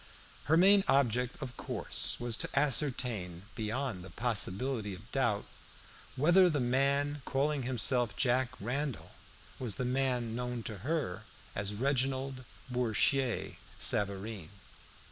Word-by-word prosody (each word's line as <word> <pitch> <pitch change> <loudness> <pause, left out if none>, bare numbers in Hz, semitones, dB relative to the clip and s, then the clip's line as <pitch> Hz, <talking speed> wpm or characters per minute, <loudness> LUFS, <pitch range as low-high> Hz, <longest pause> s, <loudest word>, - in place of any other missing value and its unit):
Her 160 +4 +4
main 195 +3 +7
object, 125 -2 +2
of 125 -2 -7
course, - - -1
was 120 -1 -1
to - - 0
ascertain, 125 - +1
beyond 110 -3 -3
the 95 - -10
possibility 115 0 0
of 105 +5 -15
doubt, 120 -7 0 0.7
whether 175 +6 +5
the 150 -3 0
man 140 +3 +1
calling 140 +2 0
himself 120 -2 +1
Jack 130 -1 +2
Randall 135 +6 -3 0.5
was 115 -6 0
the 125 - -2
man 125 -3 0
known 125 -1 -3
to 110 -3 -4
her 110 - -2 0.3
as 100 +1 -2
Reginald 130 +1 -1 0.2
Bourchier 125 +1 +1 0.2
Savareen. 100 -3 0
125 Hz, 120 wpm, -32 LUFS, 110-135 Hz, 0.7 s, main